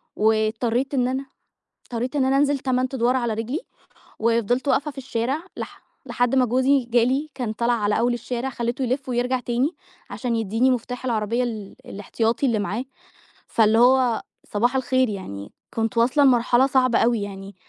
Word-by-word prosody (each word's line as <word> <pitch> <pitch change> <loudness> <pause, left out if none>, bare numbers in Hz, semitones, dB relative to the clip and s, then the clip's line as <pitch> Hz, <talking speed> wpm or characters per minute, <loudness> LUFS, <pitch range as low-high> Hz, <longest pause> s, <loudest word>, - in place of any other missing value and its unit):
واضطريت 220 +4 +1
إن 250 -2 +2
أنا 265 +2 -2 0.6
اضطريت 245 +4 -4
إن 265 -2 +2
أنا 270 +1 +2
انزل 285 -1 +2
8 255 -1 0
أدوار 250 0 +2
على 240 -3 0
رجلي، 230 +9 -3 0.6
وفضلت 235 +4 +1
واقفة 285 +2 +1
في 275 - -25
الشارع، 265 +4 -2
لح - - -8 0.2
لحد 245 +1 +1
ما 255 -1 +4
جوزي 260 +3 +2
جا 235 0 +3
لي 280 +5 0
كان 235 -5 -3
طلع 235 +2 +1
على 210 -1 +1
أول 240 +1 +2
الشارع 245 +2 -3
خلّيته 240 +2 -3
يلف 255 +2 -2
ويرجع 250 +1 0
تاني، 245 +4 0 0.4
عشان 245 -3 -2
يدّيني 225 +4 +1
مفتاح 250 +1 -3
العربية 230 +1 0
ال 215 -5 -5
الإحتياطي 225 +5 -1
اللي 230 -4 +1
معاه، 220 +5 -3 0.6
فاللي 220 0 +3
هو 250 -2 +4 0.3
صباح 240 +5 0
الخير 260 -1 +2
يعني، 105 - -7 0.2
كنت 225 +1 -2
واصلة 255 +5 +4
لمرحلة 250 0 +4
صعبة 255 -2 +3
أوي 230 -2 +2
يعني، 195 -1 -7
245 Hz, 165 wpm, -23 LUFS, 225-260 Hz, 0.6 s, ما